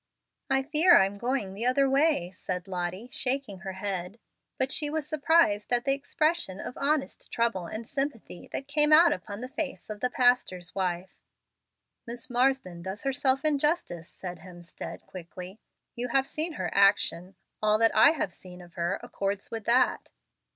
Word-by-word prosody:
"I 270 0 +2
fear 315 +5 +5
I'm 195 +1 +2
going 240 -5 -1
the 225 +5 -2
other 275 +2 +3
way," 270 - +2
said 185 0 -5
Lottie, 185 +5 -4
shaking 255 -6 -1
her 190 -1 -6
head. 190 0 -4 0.4
But 260 +1 0
she 295 -1 0
was 305 -1 -3
surprised 300 -9 +2
at 240 +1 +2
the 275 - +3
expression 285 - -1
of 250 - -6
honest 285 +1 -1
trouble 230 -7 0
and 220 +5 -6
sympathy 270 -10 -4
that 270 - -4
came 300 +1 +3
out 330 +1 +7
upon 200 +4 -7
the 255 - -5
face 270 -4 -5
of 210 - -6
the 250 - 0
pastor's 245 -9 +1
wife. 185 -1 -2 0.9
"Miss 240 +2 -7
Marsden 245 -8 +1
does 190 +3 -6
herself 270 0 +1
injustice," 295 - 0
said 180 -2 -8
Hemstead, 175 0 -10
quickly. 180 +2 -10 0.4
"You 245 +1 -3
have 265 +2 +2
seen 320 +2 -2
her - - -3
action. 195 -2 +2 0.3
All 215 0 +4
that 225 0 +3
I 220 - +8
have 200 - -2
seen 180 -1 -13
of 175 -1 -14
her 170 +3 -2
accords 200 0 -4
with 225 -2 -5
that." 245 +2 +2
230 Hz, 165 wpm, -28 LUFS, 185-275 Hz, 0.9 s, I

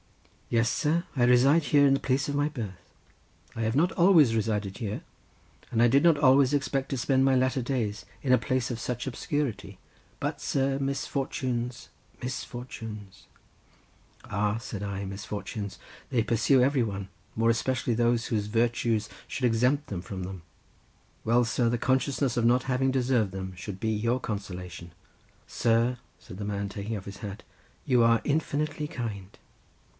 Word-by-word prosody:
"Yes, 115 0 +2
sir, 165 +3 +1
I 125 - +2
reside 135 +6 +5
here 145 -1 +5
in 135 - +4
the 135 - +2
place 135 +2 0
of 145 - -2
my 145 +1 +1
birth—I 115 - -10
have 110 +1 0
not 170 +5 +3
always 165 -10 +5
resided 105 -3 -1
here—and 115 +1 -6
I 120 - +7
did 135 +5 +4
not 165 -3 +5
always 135 -1 +5
expect 135 -1 0
to 135 - -2
spend 130 +2 +2
my 135 0 +4
latter 130 +1 +2
days 115 -5 -2 0.2
in 130 -3 +3
a - - +7
place 130 -2 -1
of 120 -2 -4
such 125 -1 -3
obscurity, 145 - -3 0.4
but, - - -3
sir, 135 0 0
misfortunes—misfortunes.. 125 -5 -5 0.5
." - - -32
"Ah," 105 +1 0
said 105 -3 -6
I, 100 -1 -3
"misfortunes! 100 +1 -5 0.3
they 125 -4 +2
pursue 120 +4 +3
every 135 0 +3
one, 100 -3 -4 0.3
more 115 +1 +2
especially 120 +1 0
those 120 0 +2
whose 105 -2 -1
virtues 115 -1 +1 0.2
should 130 - -2
exempt 125 +5 +2
them 95 -4 -4
from 95 +1 -6
them. 95 -1 -6 0.8
Well, 120 +2 +3
sir, 115 +1 +1
the 120 - +1
consciousness 130 +1 +1
of 120 - +1
not 125 +2 +4
having 130 0 +1
deserved 125 -6 +1
them 95 0 -5
should 95 +1 -7
be 110 +1 0
your 115 +4 0
consolation." 90 -6 -6 0.6
"Sir," 120 +1 +2 0.2
said 90 - -11
the - - -3
doctor, 100 -1 -2
taking 105 +2 -4
off 95 - -9
his 100 - -8
hat, 105 0 -7 0.4
"you 125 -3 +4
are 115 0 +5
infinitely 150 0 -1
kind." 105 -7 -6
120 Hz, 160 wpm, -28 LUFS, 105-135 Hz, 0.8 s, I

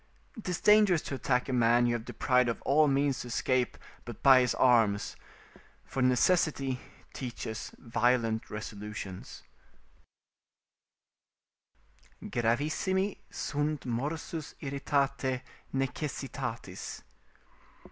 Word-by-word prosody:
'Tis 180 -4 -3
dangerous 210 -6 +5
to - - -5
attack 125 -1 0
a 135 - -2
man 120 0 +4
you 120 - +2
have 120 -1 -2
deprived 125 -2 +2
of 115 - -2
all 150 +2 +4
means 140 -1 +1
to - - -6
escape 125 +1 0 0.3
but 120 -2 -9
by 135 -2 +8
his 125 -2 +1
arms, 115 -5 +3 0.7
for 135 - -3
necessity 135 0 +2 0.3
teaches 120 -3 -5
violent 115 -1 +1
resolutions: 105 -3 -7 2.8
"Gravissimi 155 - 0
sunt 145 0 -2
morsus 150 +6 -4
irritatae 135 -2 -1 0.3
necessitatis." 130 - -4
130 Hz, 95 wpm, -30 LUFS, 120-145 Hz, 2.8 s, by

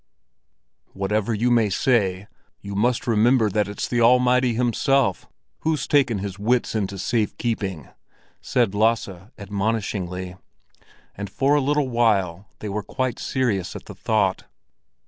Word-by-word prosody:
"Whatever 100 +3 -1
you 115 +3 +1
may 115 -3 +3
say, 100 -3 +1 0.3
you 100 - -8
must 115 +4 +1
remember 115 0 +3
that 105 +1 +1
it's 100 - -4
the 120 -1 0
Almighty 125 0 +4
Himself 125 -2 +1 0.3
who's 155 -3 -1
taken 130 -6 +3
his 100 0 -5
wits 120 +4 +1
into 100 -3 -2
safekeeping," 105 - -2 0.5
said 120 -6 +1
Lasse 105 -3 0
admonishingly; 100 -3 -3 0.7
and 100 0 -6
for 135 +8 +1
a 145 - +3
little 145 0 +1
while 100 -6 +1
they 105 - -4
were 105 +1 -2
quite 130 +4 -3
serious 105 -9 -1
at - - -8
the - - -9
thought. 100 -4 0
110 Hz, 130 wpm, -23 LUFS, 100-125 Hz, 0.7 s, Almighty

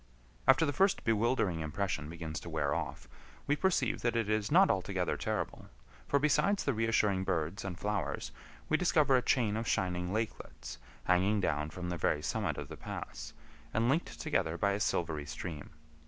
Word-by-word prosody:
After 135 +4 +6
the 145 - -1
first 195 +7 +2
bewildering 115 -5 +1
impression 80 0 -2
begins 80 -2 -5
to 85 - -9
wear 75 -3 0
off, 75 -4 -4 0.4
we 145 - +2
perceive 190 +3 +1
that 120 -1 0
it 115 -2 +1
is 110 -1 0
not - - +6
altogether - - -1
terrible; - - -3 0.4
for 140 - +3
besides 150 +7 +2
the 140 - +1
reassuring 110 -4 +2
birds 90 +2 -1
and 95 -3 -5
flowers 105 +2 -2 0.4
we 155 - +3
discover 155 -6 +3
a 125 - +4
chain 115 -5 +2
of 115 +1 -2
shining 90 -1 0
lakelets 110 +2 -4 0.2
hanging 95 +4 +3
down 75 -5 0
from 90 +1 -6
the 90 - -2
very 75 -1 +1
summit 90 -6 -1
of 70 - -5
the - - -9
pass, - - -7 0.4
and 115 +2 +2
linked 160 +6 0
together 90 - 0
by 100 +2 +2
a 100 - -1
silvery 80 -7 -1
stream. 80 -1 -6
100 Hz, 175 wpm, -32 LUFS, 85-120 Hz, 0.4 s, After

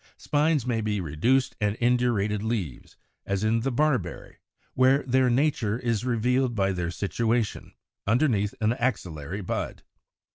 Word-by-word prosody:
Spines 150 -3 +1
may 120 -3 0
be 105 -1 -1
reduced 95 - +1
and 105 0 +1
indurated 120 -4 +1
leaves; 105 - -4 0.3
as 100 +1 -2
in 110 +1 +2
the 135 +4 -1
Barberry, 125 - -1 0.4
where 130 +2 +4
their 130 0 +2
nature 120 -4 +1
is 120 -3 -1
revealed 125 +1 +1
by 95 -2 +1
their 90 -2 -2
situation, 110 +5 -1 0.3
underneath 110 -4 +2
an 110 +1 +3
axillary 95 - -3
bud. 90 - -4
115 Hz, 135 wpm, -26 LUFS, 100-125 Hz, 0.4 s, where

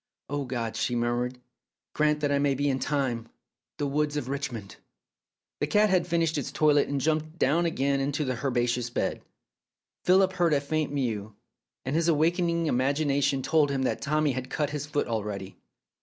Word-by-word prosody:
' - - -62
Oh, 145 -1 -1
God,' 120 -3 -3
she 125 - -1
murmured, 120 +1 -1 0.3
' - - -64
grant 150 0 +2
that 145 -1 +1
I 140 - +2
may 140 -1 +2
be 145 +1 +1
in 130 - -1
time! 130 -6 -1 0.2
' - - -64
The 145 - -1
woods 150 +1 0
of 130 -3 -3
Richmond.. 120 -7 -4 0.4
." - - -65
The 145 - +1
cat 210 +5 +3
had 180 -2 +2
finished 165 -3 +1
its 135 - -4
toilet 150 -2 +3
and 140 -1 -1
jumped 155 +3 -1
down 170 +4 +2
again 140 -3 0
into 145 +2 -1
the 130 -1 -3
herbaceous 120 -2 0
bed. - - -2 0.8
Philip 190 +1 +4
heard 175 -4 +2
a - - +3
faint 150 +1 -1
mew, 110 -7 -2 0.5
and 130 +3 -1
his 165 0 +2
awaking 170 +2 +2 0.2
imagina 140 +1 +1
tion 135 -1 +1
told 155 -1 +3
him 135 -1 -1
that - - -1
Tommy 150 0 +1
had 130 0 -4
cut 150 -2 -1
his 150 -1 -4
foot 145 0 0
already. 105 -4 -4
140 Hz, 195 wpm, -27 LUFS, 130-155 Hz, 0.8 s, Philip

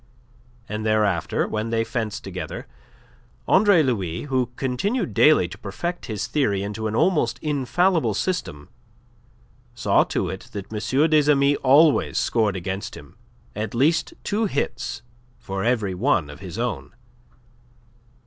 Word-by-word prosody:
And 105 -1 -4
thereafter, 105 -5 +1
when 110 +1 -3
they 115 0 +1
fenced 110 -1 -4
together, 95 -5 -6 0.8
Andre 195 -4 +5
Louis, 95 - -2
who 130 -4 0
continued 180 - -1
daily 150 - +5
to - - -10
perfect 170 - -5
his 110 -3 -3
theory 115 -6 0
into 105 +2 -3
an 110 - -3
almost 175 +5 +2
infallible 150 - +1
system, 100 - -3 1.1
saw - - +3
to - - -2
it 95 - -7
that 100 +1 -7
M. 130 +8 +1
des 150 -1 +5
Amis 140 0 +3
always 145 +3 +4
scored 110 -4 +1
against 95 +2 -4
him 75 - -14 0.4
at 105 +2 -4
least 160 +7 +2
two 215 +2 0
hits 135 - -3 0.3
for 95 0 -5
every 110 -5 +1
one 90 - +1
of 75 - -12
his 95 0 -8
own. 120 0 -3
115 Hz, 135 wpm, -23 LUFS, 100-150 Hz, 1.1 s, Andre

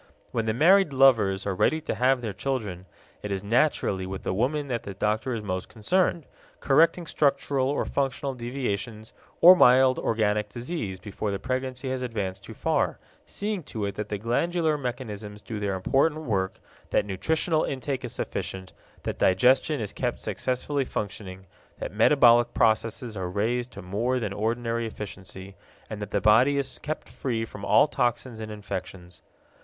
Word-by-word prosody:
When 115 -1 -1
the 110 - +1
married 175 - +5
lovers 110 -8 +4
are 100 - 0
ready 155 +11 +2
to - - -3
have 125 +3 +2
their 110 -4 -4
children, 105 -5 -3 0.3
it 105 - -5
is 95 0 -2
naturally 105 -5 +1
with 95 0 -6
the - - -1
woman 140 +8 0
that 120 -3 -2
the 100 - -8
doctor 110 +5 -1
is 110 - -5
most 95 -2 -3
concerned, 170 - 0 0.3
correcting 165 +5 +3
structural 140 -3 +1
or 145 - 0
functional 135 0 -1
deviations 120 -4 -4 0.3
or 180 +2 +10
mild 130 -4 +5
organic 105 -2 0
disease 120 - -5
before 105 +2 -4
the 100 - -1
pregnancy 130 +2 -3
has 130 -1 -2
advanced 100 -6 -3
too - - -10
far, - - 0 0.3
seeing 205 -2 -3
to 110 -8 -4
it 100 - -3
that 105 +1 -5
the 105 - -2
glandular 155 - 0
mechanisms 110 -6 -5
do 110 0 -6
their 100 -2 -1
important 140 +11 +1
work, 95 -7 -1 0.3
that - - +2
nutritional 155 - 0
intake 135 0 -3
is 125 - -5
sufficient, 95 -1 -5 0.3
that - - -4
digestion 130 +9 +3
is 105 -3 -4
kept 120 +2 -2
successfully 135 +2 -1
functioning, 95 -5 -6 0.3
that - - -6
metabolic 120 0 +5
processes 115 +1 +1
are 95 -2 -3
raised 120 +6 -1
to - - -10
more 115 +8 -1
than 105 -5 -3
ordinary 115 +2 -1
efficiency, 95 -2 -8 0.4
and 105 -1 -5
that 105 - -5
the 100 - 0
body 120 +8 +5
is 135 -1 -2
kept 155 +1 -5
free 115 -4 -3
from 105 -2 -11
all - - +5
toxins 120 -4 -1
and 110 -1 -6
infections. 95 -3 -7
115 Hz, 165 wpm, -26 LUFS, 100-135 Hz, 0.4 s, or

